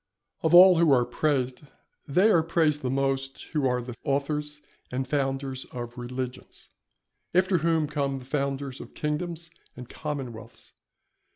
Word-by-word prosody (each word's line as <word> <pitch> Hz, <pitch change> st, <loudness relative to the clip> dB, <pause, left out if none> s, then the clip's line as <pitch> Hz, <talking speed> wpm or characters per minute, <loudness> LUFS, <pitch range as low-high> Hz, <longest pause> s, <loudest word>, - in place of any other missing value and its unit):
_ -, -, -59 dB, 0.4 s
Of 160 Hz, +2 st, +4 dB
all 180 Hz, -1 st, +9 dB
who 165 Hz, -3 st, +5 dB
are 125 Hz, -2 st, +4 dB
praised 130 Hz, 0 st, -1 dB, 0.5 s
they 185 Hz, +10 st, +4 dB
are 170 Hz, -, +5 dB
praised 160 Hz, -2 st, +1 dB
the 130 Hz, -, -2 dB
most, 135 Hz, 0 st, -1 dB
who 145 Hz, -4 st, +2 dB
are 125 Hz, -1 st, 0 dB
the 125 Hz, 0 st, -7 dB
authors 150 Hz, +1 st, -2 dB, 0.3 s
and 130 Hz, +1 st, -2 dB
founders 135 Hz, -1 st, -1 dB
of 120 Hz, -1 st, -7 dB
religions. 125 Hz, +1 st, -6 dB, 0.6 s
After 185 Hz, 0 st, +3 dB
whom 165 Hz, -1 st, +2 dB
come 140 Hz, -2 st, -1 dB
the 130 Hz, -, -10 dB
founders 135 Hz, -1 st, -3 dB
of -, -, -12 dB
kingdoms 165 Hz, +2 st, -3 dB, 0.3 s
and 125 Hz, -1 st, -8 dB
commonwealths. 120 Hz, -7 st, -7 dB
140 Hz, 150 wpm, -27 LUFS, 130-155 Hz, 0.6 s, all